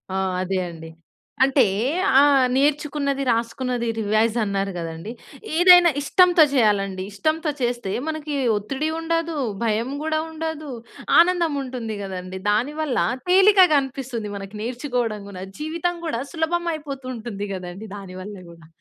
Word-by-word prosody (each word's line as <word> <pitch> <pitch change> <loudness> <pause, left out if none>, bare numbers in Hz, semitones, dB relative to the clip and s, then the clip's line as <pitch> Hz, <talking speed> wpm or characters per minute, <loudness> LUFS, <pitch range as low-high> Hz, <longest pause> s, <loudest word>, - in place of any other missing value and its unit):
ఆ! - - 0 0.2
అదే 190 +1 -1
అండి. 160 -1 -10 0.5
అంటే, 270 +1 +4 0.6
ఆ! - - +6 0.3
నేర్చుకున్నది, 280 -1 0
రాసుకున్నది 235 +1 -1
రివైజ్ 215 +2 +1
అన్నారు 195 -1 -1
కదండీ. 165 +5 -6 0.5
ఏదైనా 355 0 +8
ఇష్టంతో 355 +1 +5
చేయాలండి. 200 -6 +1
ఇష్టంతో 310 - -1
చేస్తే, 240 -5 -1 0.2
మనకి 310 -2 -3 0.2
ఒత్తిడి 270 +9 -3
ఉండదు, 330 -1 -1 0.3
భయం 230 +3 0
కూడా 315 0 0
ఉండదు, 315 -2 -5 0.5
ఆనందం 340 -3 +3
ఉంటుంది 240 -5 -5
కదండీ. 185 -1 -6
దానివల్ల, 285 +6 -1 0.3
తేలికగనిపిస్తుంది 280 - +4
మనకు 195 +1 -9
నేర్చుకోవడం 240 -4 -2
కూడా. 185 -1 -8 0.2
జీవితం 335 +3 -2
కూడా, 235 -7 -2
సులభమైయిపోతూ 320 -5 -2
ఉంటుంది 215 -3 -5
కదండీ 185 +4 -8
దానివల్ల 195 +1 -8 0.2
కూడా. 165 -2 -16
255 Hz, 115 wpm, -23 LUFS, 205-310 Hz, 0.6 s, ఏదైనా